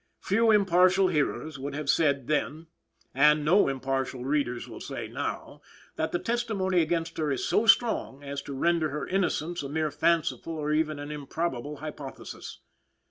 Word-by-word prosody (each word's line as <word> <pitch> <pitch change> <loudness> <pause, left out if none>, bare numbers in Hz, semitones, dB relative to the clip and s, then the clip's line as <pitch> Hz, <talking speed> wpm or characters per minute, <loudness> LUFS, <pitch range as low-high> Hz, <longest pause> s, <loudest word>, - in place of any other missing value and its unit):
Few 225 +4 +3
impartial 190 -2 +4
hearers 150 -2 -1
would 140 +1 -5
have 150 -1 -4
said 140 -3 +2
then, 155 +2 -1 0.5
and 150 +2 +4
no 185 +7 +5
impartial 135 -1 -2
readers 135 -4 -1
will - - -9
say - - -5
now, - - -5 0.3
that 160 - -2
the - - +1
testimony 195 -5 0
against 165 0 -2
her 150 -2 0
is 135 - -1
so 225 - +2
strong 200 - +3
as 140 0 -4
to 140 - -7
render 165 +3 +1
her 150 +2 -4
innocence 175 -3 -1
a 140 - -6
mere 155 0 -1
fanciful 165 +2 0
or 150 -1 -2
even 155 -1 0
an 145 +1 -6
improbable 150 -1 -3
hypothesis. 145 -2 -8
155 Hz, 160 wpm, -28 LUFS, 140-175 Hz, 0.5 s, no